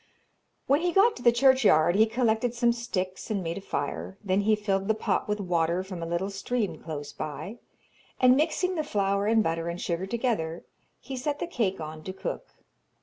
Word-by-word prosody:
When 285 +3 +3
he 350 0 +1
got 425 +6 +5
to - - -9
the 240 - +6
churchyard 235 - +4
he 220 +2 +5
collected 230 0 0
some 235 0 +3
sticks 190 -6 -4
and 200 -4 -1
made 170 +3 -3
a - - -12
fire; 190 0 -4
then 195 0 +1
he 215 +1 +3
filled 195 -2 -1
the 220 - +2
pot 215 - -1
with 210 0 -1
water 175 -1 0
from 185 -2 -7
a 165 - -3
little 170 +4 -2
stream 210 +2 -2
close 145 -3 -6
by, 155 - -6 0.6
and 255 0 +6
mixing 330 +5 +1
the 315 -4 -1
flour 200 -6 0
and 220 0 +4
butter 165 -2 -1
and 170 +1 -4
sugar 175 +2 -2
together, 205 -8 -2 0.3
he 265 +2 -7
set 285 +3 -2
the - - -3
cake 225 - -1
on 155 0 -7
to 185 - -4
cook. 190 - -5
205 Hz, 200 wpm, -27 LUFS, 180-245 Hz, 0.6 s, the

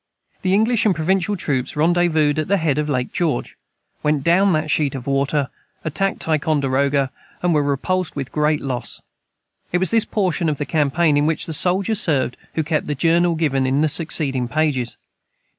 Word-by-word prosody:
The 185 0 +2
English 225 +2 +2
and 195 - +2
provincial 190 +5 0
troops 130 -7 -2
rendezvoused 160 -2 +2
at 155 - -2
the 200 - +2
head 155 -5 0
of 150 0 -2
Lake 125 -3 -2
George, 160 -8 -1 0.5
went 150 -2 0
down 190 +5 +4
that 155 -1 -1
sheet 145 -2 +1
of 130 -2 -6
water, 140 0 0 0.3
attacked 195 +6 -1
Ticonderoga, 140 -3 +1 0.3
and 175 -1 +2
were 150 - +3
repulsed 160 +6 -1
with 135 -3 -5
great 150 0 +1
loss. 130 -3 -4 0.7
It 180 - +2
was 185 -1 +1
this 225 -1 +3
portion 180 -5 0
of 150 - -2
that 145 - -3
campaign 150 0 +1
in 145 +1 +2
which 160 -1 -1
the 160 - -4
soldier 185 +6 +2
served 150 - +1 0.2
who 160 - 0
kept 155 0 -1
the 150 - -2
Journal 170 +3 +2
given 135 -5 0
in 135 +3 +1
the 155 - +2
succeeding 140 -5 +1
pages. 140 -4 -1
155 Hz, 180 wpm, -20 LUFS, 140-175 Hz, 0.7 s, down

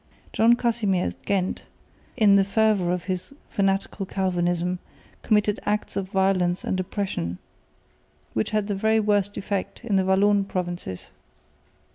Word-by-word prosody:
John 230 +2 +5
Casimir 225 -7 +1
at - - -6
Ghent, 190 -2 -1 0.5
in 210 -4 +6
the 200 - +5
fervour 200 -3 +2
of 180 -1 -2
his 185 +7 -4 0.2
fanatical 195 0 0
Calvinism, 180 -2 0 0.4
committed 210 -1 +2
acts 210 0 -1
of 190 -1 -2
violence 190 -2 +1
and 185 - -1
oppression, 180 - -3 1.0
which 110 - 0
had 215 -1 0
the 205 - -2
very 220 +3 +2
worst 205 -1 +1
effect 200 +4 -4
in 205 -4 +1
the 190 - +3
Walloon 200 +1 +3
provinces. 175 - -5
195 Hz, 135 wpm, -25 LUFS, 185-210 Hz, 1.0 s, in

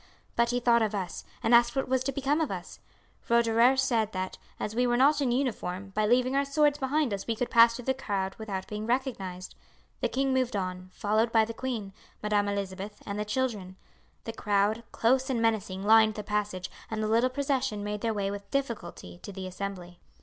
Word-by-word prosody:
But 235 0 +3
he 245 0 +1
thought 235 -1 +4
of 215 -1 0
us, 185 -3 -4 0.2
and 225 - +2
asked 235 +2 +5
what 270 - 0
was 260 0 +1
to 275 - 0
become 275 +3 0
of 315 - 0
us. - - -7 0.5
Roederer 235 +2 +4
said 230 -5 +1
that, 185 0 -4 0.2
as 210 - -3
we 245 +2 +2
were 240 0 +2
not 285 +3 +4
in 260 -3 +1
uniform, 205 -7 -2
by 210 +2 0
leaving 255 +3 +3
our 280 - +3
swords 290 +1 +2
behind 275 -2 +1
us 195 -1 -5
we 230 - 0
could 245 +2 -3
pass 230 0 +7
through 245 - -8
the 265 - +2
crowd 195 -7 -2
without 195 -4 -4
being 210 +1 -5
recognized. 200 -8 -2 0.5
The - - 0
king 270 0 0
moved 255 -3 0
on, 185 -1 -4
followed 215 +4 +1
by 225 -1 +4
the 230 - -6
queen, 225 -6 -4 0.3
Madam 205 -1 +1
Elizabeth, 200 0 -4
and 200 0 -4
the 210 - -1
children. 210 -5 -2 0.5
The 225 - -5
crowd, 210 +1 +1
close 260 +3 +2
and 255 -3 0
menacing, 215 -4 0
lined 220 0 +5
the 210 - -5
passage, 205 -3 -2 0.2
and 220 -1 -2
the - - 0
little 230 +4 +3
procession 265 -5 -1
made 210 0 -3
their 230 - 0
way 200 -2 -1
with 200 0 -7
difficulty 205 - -4
to - - -8
the 190 -1 -6
Assembly. 185 -2 -6
225 Hz, 210 wpm, -28 LUFS, 200-255 Hz, 0.5 s, pass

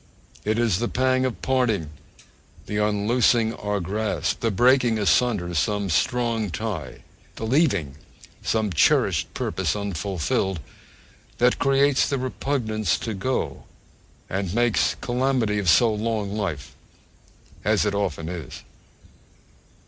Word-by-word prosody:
It 110 +1 0
is 115 -6 +2
the 120 - 0
pang 130 +1 +1
of 130 - -4
parting, 115 - 0 0.7
the 105 - -3
unloosing 110 +2 +2
our 105 -2 -2
grasp, 95 -3 -2
the 115 - 0
breaking 120 +2 +3
asunder 105 -4 +1
some 100 +4 0
strong 115 +3 0
tie, 95 -1 -5 0.3
the 110 - -5
leaving 110 - +1 0.4
some 110 -4 0
cherished 90 - +2
purpose - - -1
unfulfilled, 95 -2 -2 0.8
that 125 +1 +3
creates 135 0 +3
the 140 - 0
repugnance 120 -6 -1
to 110 - -4
go, 125 +7 -3 0.6
and 95 0 -3
'makes 120 -1 +2
calamity 125 -4 0
of 95 -4 +1
so 115 +5 +5
long 105 -2 -2
life,' 80 -10 -4 0.9
as 105 0 +2
it 105 - 0
often 95 -6 -2
is. 85 -6 -7
110 Hz, 120 wpm, -24 LUFS, 95-120 Hz, 0.9 s, so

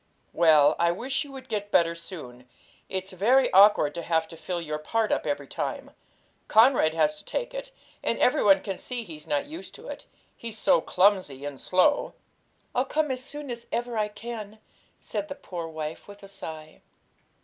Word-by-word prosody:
'Well, 155 -3 +5
I 170 - +4
wish 255 - -2
you 285 - -12
would 265 -1 -10
get 205 -3 -3
better 170 -4 +3
soon; 150 -8 -9 0.4
it's 190 +1 -3
very 245 +8 +3
awkward 195 -6 +6
to 170 - -4
have 160 -1 0
to 165 - -10
fill 175 +2 -4
your 155 -2 -4
part 220 +8 0
up - - 0
every - - -1
time. - - -4 0.6
Conrad 220 -9 +5
has 300 - +2
to - - -13
take - - -3
it, - - -6 0.3
and 230 - 0
every 250 - +3
one 195 -2 +6
can 195 -2 -4
see 245 -2 -4
he's 155 -6 -10
not 145 - 0
used 320 +4 -9
to - - -12
it, - - -8 0.3
he's 230 -2 -6
so 165 - +4
clumsy 180 -9 +2
and 145 -2 -6
slow.' 185 +11 +2 0.6
'I'll 255 - +1
come 300 +1 0
as 255 0 -4
soon 290 0 -7
as 235 -1 -7
ever 240 0 -2
I 215 -1 +1
can,' 215 0 -8 0.4
said 305 - -4
the 285 - -6
poor 175 - -6
wife, 155 -1 -6
with 205 0 -13
a - - -9
sigh. 160 -5 -9
200 Hz, 190 wpm, -27 LUFS, 165-245 Hz, 0.6 s, awkward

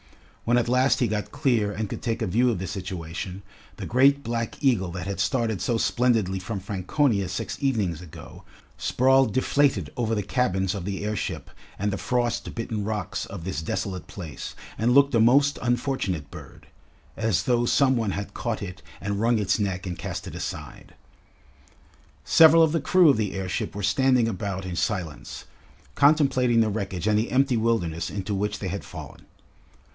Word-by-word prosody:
When 120 +1 +3
at 120 - +1
last 125 +2 +3
he 120 - +2
got 105 -1 -3
clear 125 -8 +1
and 105 +1 -3
could - - -6
take 115 -1 -2
a - - -1
view 120 +7 +2
of 115 - 0
the 95 - -4
situation, 90 0 -6 0.3
the - - -5
great 140 +4 +4
black 115 +2 -3
eagle 115 - +2
that 90 0 -5
had 100 0 -4
started 115 -7 0
so 120 - 0
splendidly 115 -6 +1
from 100 +2 -4
Franconia 100 - 0
six 100 +1 -4
evenings 105 - 0
ago, 85 -4 -12 0.4
sprawled 130 +1 +3
deflated 140 +2 +1
over 115 -2 0
the 105 - -1
cabins 95 -4 0
of 100 -4 -5
the 100 +1 -3
airship 105 -1 -3 0.3
and 100 0 -1
the 95 - -3
frost 120 -1 -1
bitten 115 -2 -3
rocks 105 -3 -3
of 95 -4 -8
this 95 -3 -3
desolate 95 +3 -4
place 85 -7 -8 0.2
and 120 +3 +3
looked 140 +1 +5
a 115 - +4
most 140 +5 +4
unfortunate 120 - -1
bird - - -12 0.5
as 110 -6 0
though 120 -1 +2
some 130 +2 +3
one 115 -4 0
had 100 +1 -5
caught 115 -3 -3
it 95 -1 -7 0.2
and 100 0 -3
wrung 115 +1 +3
its 105 0 +1
neck 95 -2 -2
and 90 -3 -5
cast - - -5
it - - -7
aside. - - -7 1.3
Several 165 0 +7
of 160 - +3
the 165 - 0
crew 180 -4 +5
of 135 - +4
the 105 -3 -2
airship 95 0 -3
were 105 - -4
standing 125 +3 +3
about 100 -3 -3
in 90 -2 -4
silence, 85 -6 -3 0.5
contemplating 135 -5 +3
the 110 -1 +3
wreckage 95 -3 -3
and 105 -1 +3
the 110 - -2
empty 135 0 +3
wilderness 110 -8 0
into 100 +1 -4
which 105 +1 -1
they 100 - -5
had 100 +2 -4
fallen. - - -10
110 Hz, 180 wpm, -25 LUFS, 95-125 Hz, 1.3 s, Several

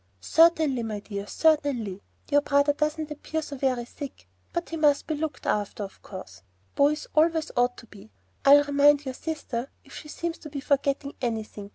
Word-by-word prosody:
"Certainly, 315 - +4
my 220 -2 -4
dear, 200 -1 -6
certainly. 275 -12 +1 0.3
Your 290 0 +5
brother 285 0 +3
doesn't 305 +1 -2
appear 315 +1 -4
so 285 - -7
very 255 -3 0
sick; 270 - -9 0.2
but 340 0 -3
he 330 - -4
must 295 -3 +3
be 315 - -2
looked 310 0 -4
after, 205 0 -1
of 195 - -10
course. 190 - -10 0.3
Boys 295 +2 +2
always 320 0 +2
ought 245 0 +2
to - - -12
be. 205 - -15 0.3
I'll 285 +1 +8
remind 290 0 +4
your 260 - -3
sister 270 -4 -4
if 275 - -17
she 300 - -9
seems 335 +2 -4
to 305 - -9
be 285 -1 -5
forgetting 280 0 0
anything. 220 -4 -4
285 Hz, 180 wpm, -26 LUFS, 240-305 Hz, 0.3 s, I'll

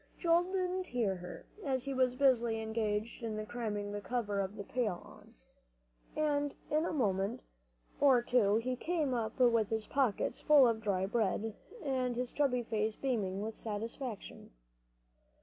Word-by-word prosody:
Joel 340 0 +3
didn't 370 0 -1
hear 215 -6 0
her, 180 0 -9 0.2
as 260 -4 0
he 275 - -3
was 255 -1 +2
busily 240 -4 +3
engaged 220 0 -2
in 215 -2 -3
cramming 210 -3 -3
the 205 0 -4
cover 205 -4 -1
on 195 +1 -4
the 200 - -5
pail, 210 -5 -3 0.9
and 290 -2 0 0.2
in 305 +2 +2
a - - -1
minute 210 -3 0 0.6
or 265 -4 +5
two 230 -5 +3
he 250 +3 0
came 310 -1 -1
up 230 0 -2
with 230 -4 +4
his 220 -1 -1
pockets 260 -7 0
full 290 -4 +7
of 225 -1 0
dry 195 -3 0
bread, 220 +1 0 0.3
and 255 -3 0
his 250 +1 -2
chubby 255 -4 +1
face 220 -1 -1
beaming 205 -7 -1
with 220 +1 -4
satisfaction. 225 +1 -6
235 Hz, 150 wpm, -33 LUFS, 210-265 Hz, 0.9 s, full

